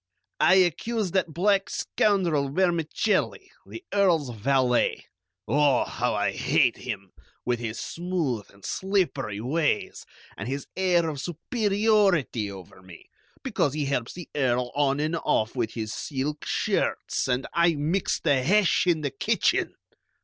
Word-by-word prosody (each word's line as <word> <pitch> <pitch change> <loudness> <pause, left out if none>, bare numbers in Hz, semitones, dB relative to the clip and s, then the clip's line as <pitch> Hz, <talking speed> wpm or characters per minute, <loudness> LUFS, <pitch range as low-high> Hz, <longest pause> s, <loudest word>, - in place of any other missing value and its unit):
"I - - +5
accuse 190 +3 +1
that 180 -3 0
black 195 +4 +1
scoundrel 170 -9 +1
Vermicelli, 175 +4 0 0.2
the 345 - -9
Earl's 170 -10 +2
valet. 125 +2 +1 0.4
Oh, 145 -2 +3
how - - -2
I - - +1
hate - - +2
him, 100 -2 -6 0.3
with 120 -1 0
his 115 -1 -4
smooth 165 - -3
and 100 -1 -16
slippery 185 - -1
ways, 150 +2 -1 0.3
and 100 - -6
his 140 +2 -3
air 180 -3 +2
of 145 -4 -4
superiority 195 - +1
over 95 -1 -11
me, 90 -2 -15 0.3
because 145 0 0
he 150 -2 -1
helps 130 -4 -2
the 175 -1 -9
Earl 125 -3 0
on 140 -1 +1
and 155 +3 0
off 110 -7 0
with 115 -3 -2
his 110 -2 -4
silk 145 +1 -4
shirts, - - -1
and 125 +1 0
I 170 -1 +3
mix 160 +6 0
the 140 -5 +2
hash 185 +4 +3
in 165 -3 +2
the 145 -2 -2
kitchen!" 135 - 0
150 Hz, 140 wpm, -26 LUFS, 125-180 Hz, 0.4 s, I